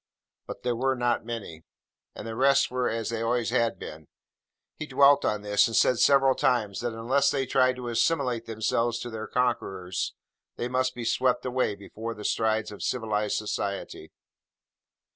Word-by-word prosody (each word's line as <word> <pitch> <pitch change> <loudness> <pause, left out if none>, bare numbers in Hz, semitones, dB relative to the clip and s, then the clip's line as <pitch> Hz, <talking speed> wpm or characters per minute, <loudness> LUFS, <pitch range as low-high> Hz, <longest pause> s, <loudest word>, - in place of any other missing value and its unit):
But - - -8
they 125 - 0
were 130 +3 0
not 120 -2 -1
many; 100 -9 -6 0.5
and - - -8
the 115 - -5
rest 135 +2 +3
were 125 -1 0
as 115 -1 -3
they 115 -1 -3
always 115 -1 0
had 115 -1 +1
been. 75 -1 -9 0.7
He 150 - -5
dwelt 140 +1 +5
on 105 -1 -1
this: 105 +1 +3
and 115 - -4
said 125 +2 +3
several 135 0 +5
times 110 -6 0
that 120 -1 -3
unless 130 +5 +1
they 135 -2 0
tried 130 -1 +2
to 125 -1 -7
assimilate 120 -1 0
themselves 115 +1 0
to 120 - -6
their 110 0 -6
conquerors, 95 -7 -2 0.4
they 120 - -3
must 130 +1 0
be 120 -1 -5
swept 125 +2 +1
away 125 -4 0
before 110 +3 -7
the 105 - -9
strides 110 -1 0
of 105 - -10
civilised 105 -4 -1
society. 100 -6 -4
115 Hz, 170 wpm, -27 LUFS, 110-125 Hz, 0.7 s, dwelt